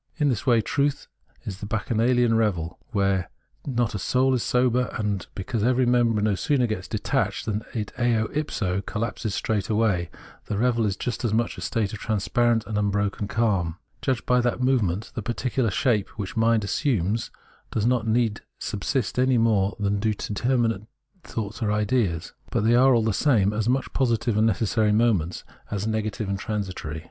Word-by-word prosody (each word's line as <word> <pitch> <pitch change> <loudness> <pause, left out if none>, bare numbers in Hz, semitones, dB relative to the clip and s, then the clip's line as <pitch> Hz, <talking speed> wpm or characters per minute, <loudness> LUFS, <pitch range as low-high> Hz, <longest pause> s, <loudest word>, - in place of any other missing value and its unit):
In 150 -3 +2
this 120 -2 -2
way 120 -3 +5
truth 140 +5 0 0.4
is 95 -2 -6
the 105 - -6
bacchanalian 115 +2 +2
revel, 90 -7 0
where 100 -5 +1 0.4
not 120 -4 0
a 100 - -3
soul 130 +7 +2
is 125 - +1
sober; 125 +1 +2
and 105 -4 -2
because 100 +3 -2
every 125 +2 +3
member 120 -3 +3
no 105 -1 +2
sooner 125 - +1
gets 110 -5 -3
detached - - -1
than 105 -1 -1
it 105 -3 -3
60 - - -7 0.3
ipso 105 -11 -1
collapses 105 0 -3
straightway, 105 -4 0 0.4
the 105 - -3
revel 115 -1 +2
is 100 -1 -2
just 125 +1 -3
as 110 -2 +1
much 115 +1 0
a - - -9
state 110 -4 -1
of 105 - -6
transparent 115 +2 +1
imbroken 105 -1 -1
calm. 95 -8 0 0.2
Judged 130 -3 -1
by 125 0 +3
that 120 0 0
movement, 110 -6 +1
the 115 - -4
particular 120 +2 -1
shapes 110 -2 +1
which 100 -1 -5
mind 115 -1 +3
assumes 110 - 0 0.4
do - - -2
not 125 -3 +2
indeed 110 -1 +1 0.2
subsist 115 +3 -2
any 130 -1 +3
more 110 -3 +2
than 100 0 0
do 110 0 0
determinate 115 0 0 0.4
thoughts 110 +1 -5
or 105 -2 +1
ideas; 105 -6 0 0.2
but - - 0
they 115 +2 +4
are, 130 +1 +6
all 115 - +3
the 110 -1 +1
same, 105 -5 +3
as 110 +2 0
much 130 +1 0
positive 120 -3 +1
and 110 +1 +4
necessary 110 +1 +1
moments, 105 -7 +1 0.3
as 100 0 -2
negative 110 0 -2
and 100 0 -2
tran 105 +1 -2
sitory. 80 -4 -6
110 Hz, 175 wpm, -25 LUFS, 100-120 Hz, 0.4 s, are